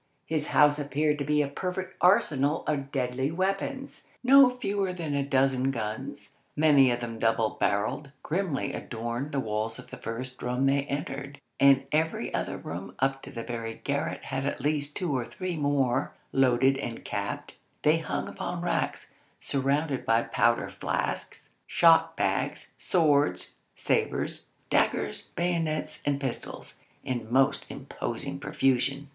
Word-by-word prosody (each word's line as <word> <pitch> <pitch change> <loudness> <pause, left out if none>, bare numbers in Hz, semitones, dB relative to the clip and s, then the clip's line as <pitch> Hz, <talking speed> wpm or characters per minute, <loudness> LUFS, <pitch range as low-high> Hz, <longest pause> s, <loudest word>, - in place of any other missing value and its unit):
His 155 -2 -1
house 150 0 +5
appeared 150 +1 0
to - - 0
be 150 +1 +2
a - - -2
perfect 185 +6 -4
arsenal 150 -5 +3
of 140 -2 -2
deadly 130 0 -1
weapons. 195 - -3 0.2
No 270 +1 +8
fewer 200 -6 -1
than 165 -5 -4
a 140 - +1
dozen 135 -1 +2
guns, 130 +4 -5 0.2
many 145 -4 +6
of 120 0 -1
them 115 -1 -5
double 115 -1 +2
barrelled, 105 +8 0
grimly 170 -3 -1
adorned 120 +4 -4
the 140 - 0
walls 110 -1 -2
of - - -12
the - - -7
first 125 +3 -6
room 125 +2 0
they 140 +1 +2
entered, 140 0 -5 0.2
and 135 -1 +6
every 160 +1 0
other - - -2
room 85 +4 -7
up 135 0 0
to - - -10
the 115 - -5
very 115 -1 -4
garret 145 +4 -2
had 130 0 -3
at 140 - -2
least 145 +1 -1
two 170 -7 -1
or 125 - 0
three 185 +8 -5
more, 145 -4 +1 0.2
loaded 135 +1 +4
and 115 -4 -5
capped; 100 -1 -4 0.3
they - - +4
hung - - -3
upon - - -4
racks, - - -2 0.3
surrounded 140 +1 0
by 115 +1 +3
powder 115 0 +1
flasks, - - -3 0.2
shot 165 -1 +5
bags, - - -1
swords, 150 -5 +2 0.2
sabres, - - -1 0.2
daggers, - - +1
bayonets, 165 -3 -1
and 140 -1 +1
pistols, 135 -4 -5 0.2
in 120 -3 -4
most 135 +1 +3
imposing - - -5
profusion. 135 +2 +1
140 Hz, 145 wpm, -28 LUFS, 125-155 Hz, 0.3 s, No